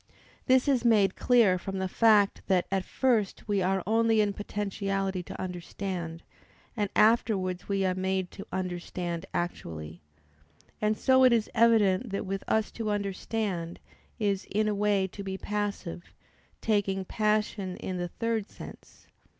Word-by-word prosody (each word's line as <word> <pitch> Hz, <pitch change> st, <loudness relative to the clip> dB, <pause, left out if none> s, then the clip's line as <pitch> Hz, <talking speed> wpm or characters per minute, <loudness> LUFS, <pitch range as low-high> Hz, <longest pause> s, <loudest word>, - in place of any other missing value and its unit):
This 260 Hz, +1 st, +4 dB
is 260 Hz, -4 st, +2 dB
made 210 Hz, -5 st, +4 dB
clear 225 Hz, -7 st, +4 dB
from 195 Hz, +1 st, -5 dB
the 190 Hz, 0 st, -1 dB
fact, 210 Hz, 0 st, +4 dB
that 185 Hz, -2 st, +2 dB
at 195 Hz, -1 st, +1 dB
first 230 Hz, -4 st, 0 dB
we 205 Hz, -2 st, +1 dB
are 190 Hz, 0 st, +1 dB
only 225 Hz, +1 st, +3 dB
in 205 Hz, -1 st, +2 dB
potentiality 195 Hz, -2 st, -2 dB
to -, -, -9 dB
understand, 180 Hz, -2 st, -5 dB, 0.5 s
and 205 Hz, -3 st, -1 dB
afterwards 210 Hz, -5 st, +2 dB
we 195 Hz, -1 st, +1 dB
are 185 Hz, -, +2 dB
made 190 Hz, 0 st, -1 dB
to 200 Hz, -, -10 dB
understand 175 Hz, -2 st, -4 dB
actually. 80 Hz, -, -4 dB, 0.8 s
And 215 Hz, 0 st, +1 dB
so 260 Hz, -1 st, +4 dB
it 255 Hz, -, +7 dB
is 230 Hz, -2 st, +1 dB
evident 225 Hz, -1 st, +4 dB
that 195 Hz, +1 st, -3 dB
with 195 Hz, 0 st, -3 dB
us 220 Hz, -1 st, +1 dB
to 225 Hz, -2 st, -4 dB
understand 200 Hz, -3 st, -2 dB, 0.4 s
is 200 Hz, -3 st, 0 dB
"in 215 Hz, +2 st, +1 dB
a 210 Hz, -, +1 dB
way 205 Hz, -1 st, +2 dB
to 190 Hz, +2 st, -8 dB
be 190 Hz, -1 st, -4 dB
passive"; 205 Hz, -4 st, -4 dB, 0.5 s
taking 195 Hz, -3 st, 0 dB
passion 210 Hz, -3 st, -1 dB
in 185 Hz, -, -4 dB
the 175 Hz, 0 st, -2 dB
third 225 Hz, +2 st, -2 dB
sense. -, -, -12 dB
200 Hz, 150 wpm, -28 LUFS, 185-215 Hz, 0.8 s, it